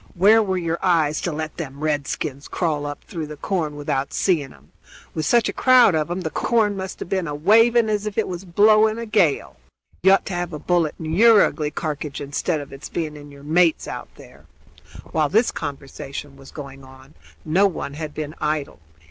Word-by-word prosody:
"Where 210 Hz, +5 st, +6 dB
were 190 Hz, -3 st, -1 dB
your 170 Hz, -1 st, -2 dB
eyes 160 Hz, -5 st, +2 dB
to 175 Hz, -, -2 dB
let 155 Hz, 0 st, -5 dB
them 140 Hz, -3 st, -7 dB
redskins 145 Hz, -1 st, -2 dB
crawl 150 Hz, -4 st, -1 dB
up 145 Hz, -, -7 dB
through 160 Hz, -3 st, -6 dB
the 150 Hz, 0 st, -9 dB
corn 160 Hz, -4 st, -2 dB
without 140 Hz, -2 st, -2 dB
seeing 155 Hz, -8 st, 0 dB
'em? -, -, -20 dB, 0.4 s
With 155 Hz, -1 st, -2 dB
such 235 Hz, -2 st, +3 dB
a -, -, -3 dB
crowd 255 Hz, -6 st, +5 dB
of 155 Hz, 0 st, 0 dB
'em 175 Hz, +2 st, -3 dB
the 160 Hz, -3 st, -4 dB
corn 215 Hz, +3 st, +1 dB
must 190 Hz, -1 st, -6 dB
have -, -, -6 dB
been 190 Hz, -3 st, -1 dB
a 145 Hz, -, -4 dB
waving 225 Hz, +8 st, +4 dB
as 210 Hz, -1 st, -1 dB
if 210 Hz, -, -6 dB
it 220 Hz, -, +1 dB
was 180 Hz, 0 st, -5 dB
blowing 215 Hz, +4 st, +4 dB
a 230 Hz, -, -4 dB
gale. 195 Hz, -9 st, +1 dB, 0.4 s
You 190 Hz, +2 st, +6 dB
ought 195 Hz, -, +2 dB
to 195 Hz, -, -5 dB
have 175 Hz, -1 st, -3 dB
a -, -, -3 dB
bullet 170 Hz, -1 st, 0 dB
in 160 Hz, 0 st, -5 dB
yer 225 Hz, +3 st, +7 dB
ugly 150 Hz, -2 st, -2 dB
carkidge, 150 Hz, -2 st, -4 dB
instead 145 Hz, +3 st, -2 dB
of 140 Hz, -, -11 dB
its 135 Hz, -, -9 dB
being 155 Hz, -3 st, -3 dB
in 145 Hz, 0 st, -11 dB
yer 140 Hz, 0 st, -14 dB
mate's 165 Hz, +2 st, +2 dB
out -, -, -7 dB
there." -, -, -16 dB, 0.6 s
While 155 Hz, -2 st, +1 dB
this 225 Hz, +7 st, +3 dB
conversation 140 Hz, -1 st, -7 dB
was 135 Hz, 0 st, -14 dB
going 135 Hz, -2 st, -10 dB
on 130 Hz, +2 st, -16 dB, 0.3 s
no 185 Hz, +6 st, +4 dB
one 155 Hz, -6 st, -5 dB
had 150 Hz, 0 st, -6 dB
been 155 Hz, -1 st, -5 dB
idle. 150 Hz, -1 st, -2 dB
160 Hz, 205 wpm, -22 LUFS, 145-195 Hz, 0.6 s, yer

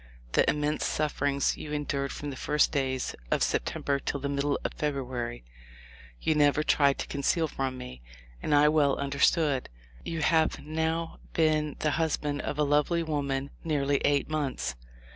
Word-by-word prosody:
The -, -, +3 dB
immense 150 Hz, +1 st, 0 dB
sufferings 145 Hz, -2 st, 0 dB
you 150 Hz, -, -7 dB
endured 140 Hz, -2 st, -2 dB
from 145 Hz, -1 st, -5 dB
the -, -, -6 dB
first 150 Hz, +3 st, +2 dB
days 130 Hz, -2 st, -1 dB, 0.2 s
of -, -, +2 dB
September 140 Hz, -1 st, 0 dB
till 140 Hz, -, -3 dB
the 140 Hz, +1 st, -3 dB
middle 140 Hz, 0 st, 0 dB
of -, -, -3 dB
Feb 150 Hz, -2 st, -1 dB
ruary 125 Hz, -, -4 dB, 0.8 s
you 160 Hz, -, +1 dB
never 150 Hz, 0 st, +3 dB
tried 140 Hz, -2 st, +3 dB
to -, -, -3 dB
conceal 160 Hz, +4 st, 0 dB
from 135 Hz, -3 st, -3 dB
me, 65 Hz, -, -9 dB, 0.4 s
and 150 Hz, -, +2 dB
I 145 Hz, +1 st, +6 dB
well 150 Hz, -2 st, +3 dB
understood. 140 Hz, 0 st, +2 dB, 0.3 s
You 165 Hz, -1 st, -3 dB
have 160 Hz, -1 st, +3 dB
now 160 Hz, +1 st, -2 dB
been 155 Hz, -2 st, +2 dB
the 150 Hz, -, +2 dB
husband 150 Hz, -2 st, -1 dB
of 145 Hz, -, -4 dB
a 150 Hz, -, +3 dB
lovely 150 Hz, +4 st, +2 dB
woman 140 Hz, -3 st, -2 dB
nearly 145 Hz, -3 st, +1 dB
eight 145 Hz, +1 st, +1 dB
months. 135 Hz, -, -2 dB
145 Hz, 160 wpm, -28 LUFS, 140-155 Hz, 0.8 s, I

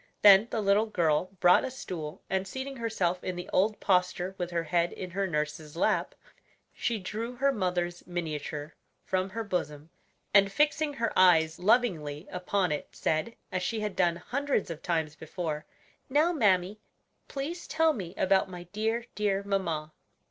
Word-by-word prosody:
Then 205 Hz, +1 st, +9 dB
the 220 Hz, -, -1 dB
little 200 Hz, +3 st, +3 dB
girl 165 Hz, -6 st, +2 dB
brought 180 Hz, 0 st, +6 dB
a -, -, -2 dB
stool, 175 Hz, -, -7 dB
and 190 Hz, 0 st, -1 dB
seating 265 Hz, +5 st, -5 dB
herself 190 Hz, -7 st, -1 dB
in 185 Hz, -, -3 dB
the 180 Hz, -, -6 dB
old 205 Hz, +3 st, +2 dB
posture 180 Hz, -1 st, +1 dB
with 175 Hz, -1 st, -2 dB
her 170 Hz, -1 st, -1 dB
head 170 Hz, +2 st, +1 dB
in 185 Hz, -1 st, -7 dB
her 195 Hz, +2 st, -1 dB
nurse's 150 Hz, -1 st, -3 dB
lap, -, -, +1 dB, 0.6 s
she 235 Hz, -, -1 dB
drew 220 Hz, +5 st, -5 dB
her 275 Hz, +3 st, +2 dB
mother's 180 Hz, -5 st, -2 dB
miniature 155 Hz, -3 st, -4 dB, 0.3 s
from 185 Hz, 0 st, 0 dB
her 225 Hz, +4 st, -4 dB
bosom, 160 Hz, -6 st, -3 dB, 0.4 s
and 200 Hz, -1 st, +6 dB
fixing 300 Hz, +4 st, +2 dB
her 230 Hz, -2 st, -1 dB
eyes 165 Hz, -3 st, +5 dB
lovingly 180 Hz, -7 st, +1 dB
upon 180 Hz, 0 st, 0 dB
it, 150 Hz, -, -2 dB
said, 155 Hz, +9 st, -1 dB, 0.2 s
as 185 Hz, -1 st, -1 dB
she 220 Hz, +4 st, -2 dB
had 210 Hz, -3 st, -3 dB
done 175 Hz, -2 st, +2 dB
hundreds 260 Hz, +2 st, -1 dB
of 165 Hz, -1 st, -7 dB
times 160 Hz, -3 st, -1 dB
before: 160 Hz, -1 st, -5 dB, 0.4 s
"Now, 300 Hz, +6 st, +3 dB
mammy, 200 Hz, -, +2 dB, 0.5 s
please 305 Hz, +6 st, -5 dB
tell 320 Hz, +2 st, +3 dB
me 185 Hz, -, -6 dB
about 190 Hz, 0 st, +3 dB
my 180 Hz, -1 st, -8 dB
dear, 225 Hz, +3 st, -1 dB
dear 200 Hz, -2 st, 0 dB
mamma." 170 Hz, -6 st, -2 dB
185 Hz, 160 wpm, -29 LUFS, 170-220 Hz, 0.6 s, Then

